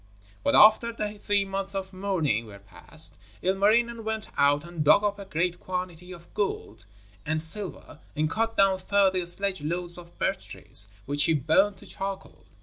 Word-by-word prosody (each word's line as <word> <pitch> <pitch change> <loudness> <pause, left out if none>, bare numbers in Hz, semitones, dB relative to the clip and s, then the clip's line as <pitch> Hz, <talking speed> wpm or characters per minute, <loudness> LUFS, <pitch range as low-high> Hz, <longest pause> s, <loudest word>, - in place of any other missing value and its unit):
But - - +1
after 220 +2 +6
the 210 -2 -6
three 205 -1 0
months 195 0 -5
of 190 0 -5
mourning 165 - -2
were 100 -2 -12
past, 100 0 +2 0.3
Ilmarinen 220 +5 +1
went 220 0 -4
out 145 +2 +2
and 170 -3 -5
dug 155 +7 +5
up 205 -1 -2
a 200 - -8
great 175 0 -2
quantity 180 -1 -6
of 170 -1 -14
gold 110 - -4 0.4
and 155 +1 -2
silver 160 -2 +2 0.2
and 155 +1 0
cut 225 +7 -2
down 195 -1 +3
thirty 190 -1 +1
sledge 190 0 +1
loads 175 +3 +1
of 170 0 -14
birch - - -2
trees, 105 - 0 0.2
which 145 +1 +2
he 160 - +2
burnt 190 +8 +1
to - - -14
charcoal. 195 0 -8
185 Hz, 170 wpm, -26 LUFS, 160-200 Hz, 0.4 s, after